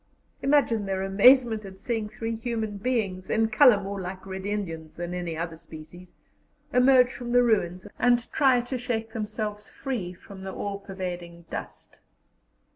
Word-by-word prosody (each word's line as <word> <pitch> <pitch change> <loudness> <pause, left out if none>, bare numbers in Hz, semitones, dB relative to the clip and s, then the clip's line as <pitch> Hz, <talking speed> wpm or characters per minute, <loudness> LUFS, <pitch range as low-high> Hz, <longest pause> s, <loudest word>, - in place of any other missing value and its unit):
Imagine 265 -7 +2
their 190 0 -1
amazement 220 +3 +5
at 190 -1 -10
seeing 225 -2 -2
three 225 +1 -4
human 220 -2 -3
beings, 200 -5 -2
in 220 0 +2
colour 245 -4 +6
more 200 0 -5
like 185 +1 -6
Red 190 0 -5
Indians 165 -7 -4
than 175 +1 -5
any 175 -3 -3
other 165 0 -3
species, 165 +2 -13 0.6
emerge 250 0 +5
from 240 -1 -5
the 245 0 +6
ruins 185 -6 +1
and 240 -1 +3
try 265 -4 +4
to 245 +1 -4
shake 225 -2 -3
themselves 210 -1 -4
free 240 -10 -4
from 190 +2 -12
the 190 0 -6
all 200 -1 -4
pervading 175 -3 -6
dust. - - -7
205 Hz, 155 wpm, -26 LUFS, 185-240 Hz, 0.6 s, colour